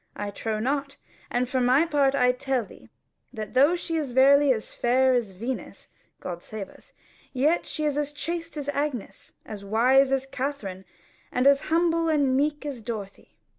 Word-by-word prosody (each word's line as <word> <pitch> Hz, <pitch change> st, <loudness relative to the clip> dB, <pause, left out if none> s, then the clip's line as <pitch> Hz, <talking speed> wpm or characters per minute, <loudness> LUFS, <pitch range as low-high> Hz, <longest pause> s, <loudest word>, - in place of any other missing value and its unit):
I 205 Hz, 0 st, -4 dB
trow 220 Hz, +1 st, -3 dB
not. 275 Hz, +4 st, -2 dB, 0.3 s
And 245 Hz, +1 st, 0 dB
for 255 Hz, +1 st, -1 dB
my 255 Hz, +6 st, +4 dB
part 280 Hz, -4 st, +2 dB
I 250 Hz, -2 st, +4 dB
tell 250 Hz, -1 st, -2 dB
thee, -, -, -16 dB, 0.4 s
that 215 Hz, -1 st, -7 dB
though 285 Hz, +7 st, +5 dB
she 335 Hz, -1 st, -3 dB
is 285 Hz, -6 st, -3 dB
verily 280 Hz, +2 st, +6 dB
as 220 Hz, -4 st, -3 dB
fair 260 Hz, +2 st, +3 dB
as 240 Hz, -4 st, 0 dB
Venus 230 Hz, +8 st, -6 dB, 0.3 s
(God 175 Hz, -1 st, -6 dB
save 210 Hz, 0 st, -7 dB
us) -, -, -18 dB, 0.4 s
yet 295 Hz, +6 st, +2 dB
is -, -, -11 dB
she 310 Hz, -, -3 dB
as 295 Hz, 0 st, 0 dB
chaste 330 Hz, +2 st, -5 dB
as 285 Hz, -1 st, -4 dB
Agnes, 280 Hz, -9 st, -4 dB
as 205 Hz, -2 st, -8 dB
wise 255 Hz, +6 st, +3 dB
as 270 Hz, 0 st, +1 dB
Katherine, 250 Hz, -9 st, -5 dB, 0.5 s
and 250 Hz, +1 st, 0 dB
as 280 Hz, 0 st, +5 dB
humble 330 Hz, 0 st, +2 dB
and 285 Hz, -4 st, +2 dB
meek 295 Hz, +2 st, 0 dB
as 275 Hz, -5 st, -5 dB
Dorothy. 210 Hz, -3 st, -8 dB
270 Hz, 175 wpm, -26 LUFS, 235-290 Hz, 0.5 s, verily